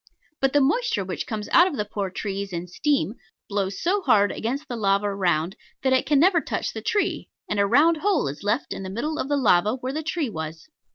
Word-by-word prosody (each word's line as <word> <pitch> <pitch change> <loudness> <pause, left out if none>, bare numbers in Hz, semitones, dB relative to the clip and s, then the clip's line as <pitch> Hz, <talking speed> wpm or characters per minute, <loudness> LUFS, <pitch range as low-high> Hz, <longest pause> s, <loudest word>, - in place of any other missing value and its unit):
But 270 -1 +1
the 290 - +5
moisture 280 - +1
which 180 -2 -4
comes 215 -2 -4
out 350 - +6
of 315 -7 -4
the 210 - -1
poor 200 -2 -3
tree 200 +1 -4
in 170 0 -4
steam 275 - 0 0.3
blows 200 -1 -2
so 395 +4 +2
hard 205 - +4
against 270 +7 -3
the 245 - -4
lava 200 -1 +1
round 180 -2 0 0.3
that 265 -1 +3
it 260 - +2
can 290 -2 +4
never 345 +1 +4
touch - - -3
the - - -5
tree, 405 -3 -1 0.2
and 210 - -1
a 200 - +3
round 310 +9 +4
hole 380 - +1
is 140 +1 -6
left 210 +7 -1
in - - -6
the 190 - -5
middle 295 +11 -3
of 270 - -2
the 290 - +2
lava 210 -3 +3
where 260 +1 -5
the 310 - -2
tree 310 -4 -2
was. 160 - -6
225 Hz, 230 wpm, -24 LUFS, 195-295 Hz, 0.3 s, out